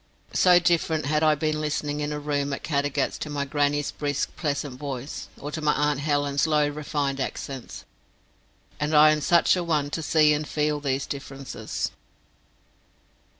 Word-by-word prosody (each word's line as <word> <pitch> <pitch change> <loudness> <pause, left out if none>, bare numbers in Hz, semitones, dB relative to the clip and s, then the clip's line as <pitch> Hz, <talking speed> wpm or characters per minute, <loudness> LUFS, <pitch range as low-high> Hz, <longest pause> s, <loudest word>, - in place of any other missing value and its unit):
So 180 -1 +6
different 170 -2 +1
had 150 +1 +1
I 155 -1 +4
been 155 +1 -1
listening 150 -1 -2
in 150 0 -2
a 150 - -2
room 145 -1 -1
at - - -5
Caddagat 145 -2 -1
to 150 - -5
my 145 -1 -2
grannie's 145 +1 0
brisk 145 -1 -2
pleasant 140 -4 -3
voice, 140 -2 -5
or 145 - -6
to 155 - -4
my 150 -1 +3
aunt 150 -1 +1
Helen's 145 0 +1
low 150 -1 +3
refined 145 -2 -2
accents; 135 -1 -5 0.9
and 150 +1 0
I 155 +1 +8
am 155 0 0
such 170 +5 +4
a 180 - -1
one 150 -4 0
to 165 - -2
see 155 -1 +4
and 150 0 -2
feel 150 0 0
these 135 -1 -1
differences. 135 -1 -5
150 Hz, 165 wpm, -25 LUFS, 140-155 Hz, 0.9 s, I